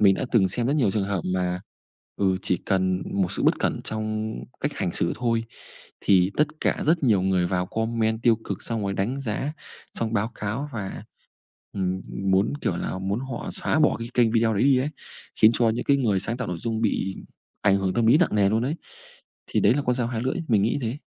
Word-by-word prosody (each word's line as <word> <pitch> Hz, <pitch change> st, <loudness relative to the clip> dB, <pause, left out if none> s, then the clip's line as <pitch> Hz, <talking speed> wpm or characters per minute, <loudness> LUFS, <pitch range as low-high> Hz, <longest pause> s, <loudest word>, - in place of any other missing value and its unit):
mình 100 Hz, -2 st, +6 dB
đã -, -, -2 dB
từng 95 Hz, -5 st, +4 dB
xem 120 Hz, +5 st, -1 dB
rất 140 Hz, -, +1 dB
nhiều 115 Hz, -9 st, +3 dB
trường 105 Hz, -2 st, 0 dB
hợp 100 Hz, -3 st, -1 dB
mà 90 Hz, 0 st, -1 dB, 0.6 s
ừ, 95 Hz, -2 st, +2 dB
chỉ 90 Hz, -, +1 dB
cần 95 Hz, -1 st, +1 dB
một 95 Hz, -3 st, 0 dB
sự -, -, -2 dB
bất -, -, +3 dB
cẩn -, -, 0 dB
trong 110 Hz, 0 st, -3 dB, 0.3 s
cách -, -, -1 dB
hành -, -, -2 dB
xử -, -, 0 dB
thôi 115 Hz, -1 st, 0 dB, 0.6 s
thì 95 Hz, -1 st, +4 dB
tất 150 Hz, -, +5 dB
cả -, -, 0 dB
rất 160 Hz, 0 st, +3 dB
nhiều 105 Hz, -6 st, +4 dB
người 95 Hz, -2 st, +2 dB
vào 90 Hz, 0 st, -1 dB
comment 110 Hz, +1 st, -1 dB
tiêu 115 Hz, -1 st, +5 dB
cực, -, -, -5 dB
xong 115 Hz, -2 st, -3 dB
rồi 100 Hz, 0 st, -1 dB
đánh 125 Hz, +8 st, -1 dB
giá, 135 Hz, +4 st, -2 dB, 0.4 s
xong 115 Hz, -1 st, -2 dB
báo 110 Hz, +2 st, 0 dB
cáo 110 Hz, +8 st, -3 dB
và, 100 Hz, -4 st, -5 dB, 0.7 s
ừm, 95 Hz, -1 st, -1 dB, 0.3 s
muốn, 95 Hz, +2 st, +3 dB
kiểu 85 Hz, -, -1 dB
là, 95 Hz, -, -3 dB
muốn 100 Hz, +5 st, -2 dB
họ 130 Hz, -3 st, -5 dB
xóa -, -, 0 dB
bỏ -, -, +4 dB
cái 115 Hz, -, -5 dB
kênh 120 Hz, -2 st, +4 dB
video 115 Hz, -1 st, +3 dB
đấy 100 Hz, -, +1 dB
đi 135 Hz, -1 st, +5 dB
ấy, 135 Hz, +3 st, 0 dB, 0.5 s
khiến 110 Hz, -, +9 dB
cho 115 Hz, -2 st, +3 dB
những 115 Hz, -, -2 dB
cái 140 Hz, -, +4 dB
người 110 Hz, -8 st, +1 dB
sáng 115 Hz, -, -3 dB
tạo 125 Hz, -5 st, -4 dB
nội 90 Hz, -, -3 dB
dung 115 Hz, +1 st, -2 dB
bị 95 Hz, -3 st, 0 dB, 0.5 s
ảnh 100 Hz, -1 st, +4 dB
hưởng 95 Hz, -1 st, -1 dB
tâm 115 Hz, -1 st, +2 dB
lý 125 Hz, +7 st, +6 dB
nặng 180 Hz, -10 st, +2 dB
nề 100 Hz, -2 st, +4 dB
luôn 110 Hz, +2 st, +1 dB
ấy. 150 Hz, +6 st, -1 dB, 0.7 s
Thì -, -, 0 dB
đấy -, -, +5 dB
là 145 Hz, -, 0 dB
con 125 Hz, -1 st, +1 dB
dao 120 Hz, -2 st, -1 dB
hai 115 Hz, -1 st, -3 dB
lưỡi, 130 Hz, -, -1 dB
mình 105 Hz, -4 st, +3 dB
nghĩ 120 Hz, +7 st, +1 dB
thế. 120 Hz, +6 st, -3 dB
110 Hz, 230 wpm, -25 LUFS, 95-120 Hz, 0.7 s, khiến